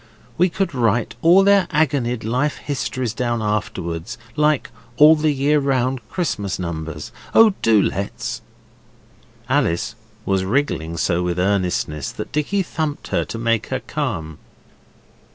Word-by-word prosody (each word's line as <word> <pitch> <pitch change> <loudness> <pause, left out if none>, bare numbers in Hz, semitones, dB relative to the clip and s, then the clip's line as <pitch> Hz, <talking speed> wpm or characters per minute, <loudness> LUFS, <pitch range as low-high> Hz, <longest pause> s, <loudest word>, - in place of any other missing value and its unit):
We 180 +2 +3
could 185 -1 -2
write 115 -3 +1
all 175 +4 +6
their 200 -2 +4
agonied 140 -7 +1
life 130 +7 0
histories 130 -4 -3
down 120 0 -1
afterwards 95 -3 -3 0.2
like 150 -2 +1 0.3
All 155 +2 +8
the 155 0 +1
Year 145 +2 +2
Round 130 -2 0
Christmas 105 - -2
numbers. 80 -3 -5 0.2
Oh, 225 -2 +7
do 110 -2 +4
let's!' 100 0 -2 1.1
Alice 85 +1 +1 0.3
was 95 -1 +1
wriggling 95 - -1
so 85 0 +1
with 90 0 -1
earnestness 90 -7 0
that - - -6
Dicky 155 +7 0
thumped 155 -4 -4
her - - +1
to - - -6
make 115 -1 0
her - - -2
calm. 80 -2 -4
120 Hz, 135 wpm, -21 LUFS, 95-150 Hz, 1.1 s, All